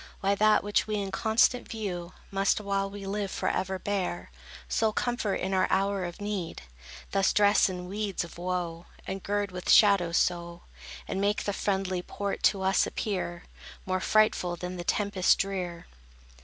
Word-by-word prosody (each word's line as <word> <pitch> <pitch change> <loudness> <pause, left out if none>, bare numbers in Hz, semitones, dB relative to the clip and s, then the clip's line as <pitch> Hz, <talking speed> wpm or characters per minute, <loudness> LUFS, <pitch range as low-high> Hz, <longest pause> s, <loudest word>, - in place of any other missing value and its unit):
Why 195 +1 +2
that, 215 +1 +4
which 205 +1 +1
we 215 - -1
in 200 -2 -2
constant 225 +5 +2
view, 185 -5 -4 0.2
Must, 195 +1 +2
while 195 -1 -1
we 200 0 -8
live, 200 0 -2
forever 190 0 -1
bear, 185 -3 -3 0.4
Sole 220 -1 +1
comfort 240 -5 -1
in 190 +1 -2
our 185 - +3
hour 195 0 +1
of 175 0 -7
need, 205 - -4 0.5
Thus 195 -1 +3
dress 205 -1 +4
in 180 -1 -5
weeds 200 0 -2
of 170 0 -11
woe, 175 -1 -3 0.2
And 190 0 -4
gird 205 0 -1
with 180 0 -6
shadows 195 -5 +5
so, 170 -1 -1 0.4
And 195 - -2
make 205 +1 +1
the 205 - -1
friendly 190 -2 -1
port 200 +2 -4
to 195 -2 -5
us 190 +1 +3
appear 180 -4 -3 0.4
More 185 0 0
frightful 200 -4 +2
than 180 +1 -6
the 175 - -4
tempest 200 0 +2
drear? 180 -4 -3
195 Hz, 165 wpm, -28 LUFS, 180-205 Hz, 0.5 s, shadows